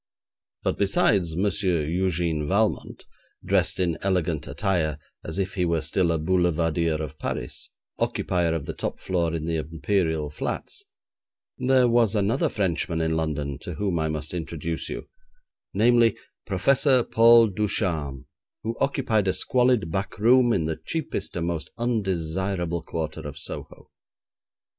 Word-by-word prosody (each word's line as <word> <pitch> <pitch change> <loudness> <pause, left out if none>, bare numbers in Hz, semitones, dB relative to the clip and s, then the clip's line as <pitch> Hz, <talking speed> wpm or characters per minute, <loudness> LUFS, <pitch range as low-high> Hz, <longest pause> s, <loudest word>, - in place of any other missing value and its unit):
But - - -1
besides 95 -3 +2
M. 85 - -1
Eugène 85 -4 0
Valmont, 105 +4 0 0.4
dressed - - +1
in 85 -3 0
elegant 85 -6 0
attire 80 -1 0 0.3
as 80 - -6
if 95 -1 -1
he 90 - 0
were 85 -2 +1
still 85 +3 +1
a 80 - +1
boulevardier 85 -1 +1
of 75 -1 -5
Paris, - - -4 0.3
occupier 85 -2 0
of 75 -4 -3
the - - -4
top - - -4
floor 85 -3 0
in 80 -1 -3
the 85 0 -1
Imperial 80 -1 -1
Flats, 75 - -4 0.7
there 130 -1 +4
was 115 -3 +3
another 105 +1 +1
Frenchman 85 -4 -1
in 80 0 0
London 75 -3 -2
to 85 +1 -7
whom 95 -3 -1
I 80 - 0
must 75 +1 -4
introduce 85 -1 -4
you, - - -6 0.6
namely, 115 +1 +4 0.3
Professor 130 +6 +3
Paul 115 0 +6
Ducharme, 85 -9 -1 0.4
who 115 +2 -2
occupied 115 -7 +1
a 95 - +3
squalid 125 -9 +2
back 95 +3 -3
room 120 +3 +5
in 85 -8 +1
the 80 0 -3
cheapest 160 - -4
and 85 -1 -1
most 85 -4 -3
undesirable 95 -6 -1
quarter 80 0 -4
of 75 - -8
Soho. - - -9
85 Hz, 140 wpm, -25 LUFS, 80-105 Hz, 0.7 s, Paul